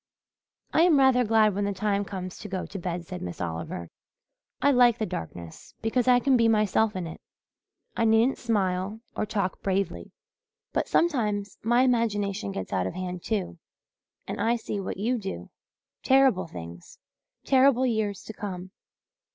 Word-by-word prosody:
"I 315 - +4
am 340 -3 +5
rather 265 -2 +5
glad 215 -2 +4
when 200 +1 -1
the 200 - -1
time 200 +1 0
comes 185 -2 -6
to 210 - -8
go 185 -1 -3
to 200 - -7
bed," 175 -1 -4
said 180 +2 -7
Miss 90 -1 -6
Oliver. 85 0 -5 0.7
"I 285 - +4
like 245 -3 +5
the 220 - -1
darkness 85 - -8
because 235 +2 +1
I 250 -1 +6
can 270 +1 +3
be 230 -2 +4
myself 215 -1 +2
in 185 -2 -3
it 165 - -8 0.7
I 230 - +1
needn't 225 +4 +3
smile 205 -2 -1
or 215 - -2
talk 200 -3 -2
bravely. 195 0 -2 0.6
But - - 0
sometimes 210 - 0
my 240 +3 +3
imagination 205 - 0
gets 95 0 -5
out 95 -1 0
of - - -6
hand, 180 -1 -5
too, 195 -6 -2 0.7
and - - -4
I 235 +1 +2
see 220 -3 -4
what 190 - -4
you 235 +5 0
do 195 -2 -6 0.5
terrible 265 -9 +4
things 85 - -10 0.5
terrible 260 -1 +4
years 220 -5 -1
to 220 - -8
come." 190 -3 -6
205 Hz, 165 wpm, -27 LUFS, 185-235 Hz, 0.7 s, I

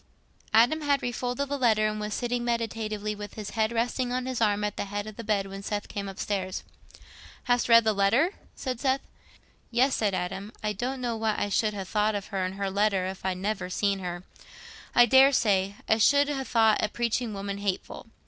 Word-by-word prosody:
Adam 240 +8 +4
had 285 -2 +1
refolded 245 +3 -2
the 285 0 -3
letter, 220 -4 +3
and 215 0 -3
was 210 0 -3
sitting 245 0 -1
meditatively 220 -3 -2
with 205 -1 -8
his 210 -2 -6
head 220 0 0
resting 245 +2 -1
on 250 0 -1
his 255 -2 -3
arm 210 -1 +2
at 210 -1 -2
the - - -3
head 205 +1 -4
of 215 -1 -8
the 230 - -7
bed, 205 -2 0
when 195 0 -8
Seth 205 +1 -3
came 200 -1 -5
upstairs. 190 -1 -3 0.8
"Hast 245 -1 +1
read 230 0 +8
the 220 -1 +2
letter?" 225 - +3 0.2
said 255 -3 -4
Seth. 265 +1 +1 0.7
"Yes," 255 +3 +2
said 205 -3 0
Adam. 190 +3 -4
"I 210 0 0
don't 255 +6 -3
know 240 -2 -1
what 220 -1 0
I 205 - -1
should 210 +1 +1
ha' 195 - -3
thought 210 +2 +1
of 200 -1 -5
her 195 -3 -2
and 185 +1 -3
her 195 -1 -2
letter 200 -2 +1
if 190 0 -6
I'd 185 -1 -1
never 190 -1 -2
seen 200 +1 0
her: 175 -1 -5 0.7
I 240 - +8
daresay 220 -7 +4
I 220 - +3
should 285 +6 +4
ha' 280 -2 -2
thought 225 -2 +3
a 215 - +1
preaching 235 -1 -1
woman 200 0 -4
hateful. 200 +2 -4
215 Hz, 205 wpm, -27 LUFS, 200-240 Hz, 0.8 s, read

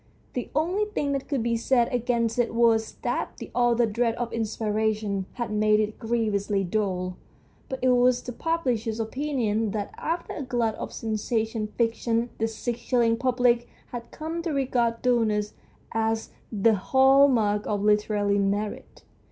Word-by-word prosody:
The 250 - -4
only 360 +8 +1
tiling 295 -9 -2
that 275 -1 -2
could 275 -6 -1
be 235 0 +1
said 240 +2 +2
against 235 -1 0
it 235 -1 +1
was 225 -1 +3
that - - -2
the - - -9
author's 240 -2 +2
dread 230 0 +1
of 240 -1 -4
inspiration 215 -3 -1
had 240 -3 -4
made 215 0 +3
it 215 0 -2
grievously 215 -4 0
dull, 185 -2 -2 0.5
but 265 - -3
it 255 - +4
was 250 0 +4
the 250 - -5
publisher's 245 -7 -1
opinion 225 -3 -1
that 210 -2 -3
after 335 +2 -3
a - - -5
glut 240 -4 0
of - - -6
sensational 220 0 -2
fiction 230 0 0
the 225 - +1
six 235 +1 -4
shilling 235 -2 +2
public 245 -1 +2 0.2
had 235 -1 -6
come 325 +2 -5
to 335 - -3
regard 245 -4 0
dullness 220 -4 +1 0.4
as 225 0 -1 0.2
the 220 +1 +3
hall 265 +7 +5
mark 210 -5 +1
of 205 -1 -1
literary 210 -1 +2
merit. 205 +1 -2
230 Hz, 155 wpm, -26 LUFS, 215-250 Hz, 0.5 s, hall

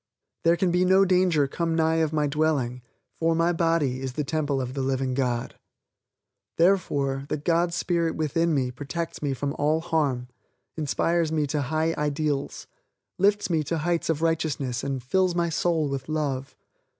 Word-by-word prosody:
There 170 +1 +4
can 180 0 +1
be 180 +1 +3
no 190 +1 +5
danger 180 -6 +3
come 165 +3 -1
nigh 160 0 +2
my 150 -1 +1
dwelling 140 -4 0 0.4
for 165 0 +2
my 165 +1 +2
body 165 -6 +1
is 130 -1 -4
the 150 - -2
temple 145 -1 -1
of 130 -1 -4
the 135 - -2
living 130 -1 -1
God. 125 -3 -2 1.0
Therefore, 145 -7 +2
the - - -1
God 170 +3 +1
Spirit 170 -1 0
within 165 +2 0
me 130 -4 0
protects 165 +6 -5
me 140 -2 -1
from 140 +2 -2
all 150 +2 +2
harm, 145 -7 -1 0.5
inspires 160 +2 0
me 155 -2 +1
to 145 +1 -1
high 155 +4 0
ideals, 150 -1 -2 0.5
lifts 205 +2 +3
me 160 -2 +2
to 165 - -1
heights 170 +2 -1
of 160 0 0
righteousness 150 -6 -1
and 135 -2 -3
fills 180 +7 +1
my 170 -1 +1
soul 160 -1 +1
with 140 +1 -4
love. 140 -4 -2
155 Hz, 165 wpm, -26 LUFS, 140-170 Hz, 1.0 s, no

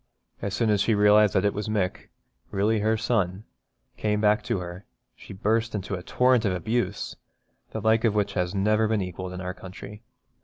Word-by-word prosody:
As 100 0 -2
soon 110 0 +2
as 105 -2 +2
she 110 +1 +2
realised 105 0 +5
that 95 - +3
it 105 - +2
was 105 +1 -4
Mick, 100 -4 -2 0.4
really 105 +3 +1
her 110 +2 +1
son, 105 -4 0 0.6
come 105 -1 0
back 105 +1 +3
to - - 0
her, 90 +1 -7 0.3
she - - -13
burst 110 +3 0
into 100 -1 -4
a 90 - -3
torrent 125 +5 +2
of 100 -4 +1
abuse, 100 +2 -2 0.5
the 110 - -5
like 110 +1 +3
of 110 -3 +2
which 100 -1 0
has 90 0 -1
never 105 +3 +2
been 105 -2 0
equalled 90 0 -6
in 90 0 -6
our 90 0 -4
country. 100 +3 -10
105 Hz, 195 wpm, -26 LUFS, 95-110 Hz, 0.6 s, realised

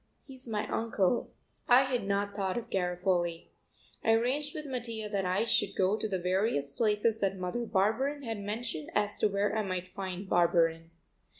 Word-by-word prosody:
He's 260 -2 -9
my 215 -2 -2
uncle." 225 -1 0 0.4
I 250 +2 +8
had 250 -6 -2
not 200 0 0
thought 190 -1 -1
of 240 - -5
Garofoli. 180 -2 0 0.5
I 225 - +4
arranged 265 +6 0
with 305 -1 -5
Mattia 230 -5 -4
that 200 -2 -1
I 185 +4 +1
should 205 -3 +1
go 190 +2 +2
to 220 0 -2
the 195 -3 -1
various 180 -5 0
places 220 +3 +1
that 195 -2 0
Mother 185 +6 -3
Barberin 235 +10 +1
had 225 -3 -4
mentioned 205 -6 -4
as 210 0 +1
to - - +4
where 205 +1 0
I 220 - +2
might 185 -3 -3
find 190 -1 -5
Barberin. 165 -2 +2
205 Hz, 175 wpm, -31 LUFS, 185-230 Hz, 0.5 s, I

